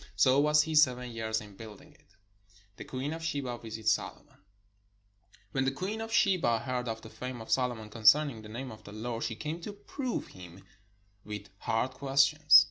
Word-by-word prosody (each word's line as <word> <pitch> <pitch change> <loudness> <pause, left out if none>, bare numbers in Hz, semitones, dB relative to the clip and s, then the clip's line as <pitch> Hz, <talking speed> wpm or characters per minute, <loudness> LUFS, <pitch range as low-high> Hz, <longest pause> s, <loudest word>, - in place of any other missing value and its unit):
So 130 +7 +5
was 150 +1 +5
he 160 0 -4
seven 125 -5 +4
years 110 -1 -2
in 105 -2 -12
building 110 -1 -12
it. - - -28 0.6
THE - - -8
QUEEN 135 +4 -3
OF 165 - -6
SHEBA 140 -7 -3
VISITS 110 -1 -1
SOLOMON - - -3
And - - -26 1.1
when 135 +3 0
the 135 - +2
queen 195 +10 -4
of 225 0 -5
Sheba 185 - +3
heard 125 -1 -3
of 110 -1 -4
the 110 - -9
fame 125 -1 -6
of 110 - -8
Solomon 120 -4 0
concerning 115 +2 +4
the 105 - -11
name 125 +4 -6
of 110 - -12
the 100 - -11
Lord, 115 +1 -4
she 115 -1 -2
came 155 +8 -5
to 205 - -5
prove 240 +5 -4
him 90 0 -12 0.6
with 105 -1 -7
hard 115 +3 0
questions. 140 +2 +6
125 Hz, 190 wpm, -30 LUFS, 110-150 Hz, 1.1 s, questions